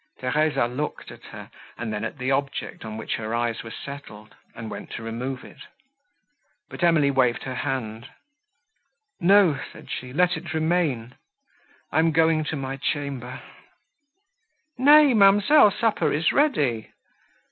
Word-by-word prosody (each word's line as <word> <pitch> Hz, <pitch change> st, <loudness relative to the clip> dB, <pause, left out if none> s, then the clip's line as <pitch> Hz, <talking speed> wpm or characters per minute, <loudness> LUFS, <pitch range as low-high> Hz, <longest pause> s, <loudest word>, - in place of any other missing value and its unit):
Theresa 145 Hz, 0 st, +1 dB
looked 130 Hz, +5 st, -5 dB
at -, -, -14 dB
her, -, -, -11 dB, 0.3 s
and 115 Hz, -2 st, -4 dB
then 105 Hz, +1 st, -4 dB
at 110 Hz, +6 st, -5 dB
the 130 Hz, +1 st, -2 dB
object, 140 Hz, +1 st, -3 dB
on 110 Hz, -1 st, -7 dB
which 110 Hz, -, -3 dB
her 110 Hz, +1 st, -4 dB
eyes 120 Hz, -1 st, -1 dB
were 115 Hz, -, -9 dB
settled, 110 Hz, -5 st, -10 dB, 0.2 s
and 110 Hz, -1 st, -7 dB
went -, -, -8 dB
to 115 Hz, -, -6 dB
remove 125 Hz, +3 st, -5 dB
it; -, -, -15 dB, 1.1 s
but -, -, -6 dB
Emily 160 Hz, -5 st, +4 dB
waved 125 Hz, -3 st, +1 dB
her 130 Hz, -, -5 dB
hand—"No," 200 Hz, -, -2 dB
said -, -, -13 dB
she, 125 Hz, 0 st, -6 dB
"let 180 Hz, +6 st, +2 dB
it -, -, -7 dB
remain. 155 Hz, -8 st, 0 dB, 0.8 s
I -, -, +2 dB
am 165 Hz, 0 st, +3 dB
going 160 Hz, 0 st, +3 dB
to 155 Hz, -, -3 dB
my 135 Hz, -1 st, -4 dB
chamber." 135 Hz, -3 st, -4 dB, 1.3 s
"Nay, 290 Hz, +1 st, +6 dB
ma'amselle, 205 Hz, +5 st, +6 dB
supper 220 Hz, +2 st, 0 dB
is 160 Hz, +3 st, +1 dB
ready." 145 Hz, -, +1 dB
140 Hz, 140 wpm, -24 LUFS, 120-180 Hz, 1.3 s, Nay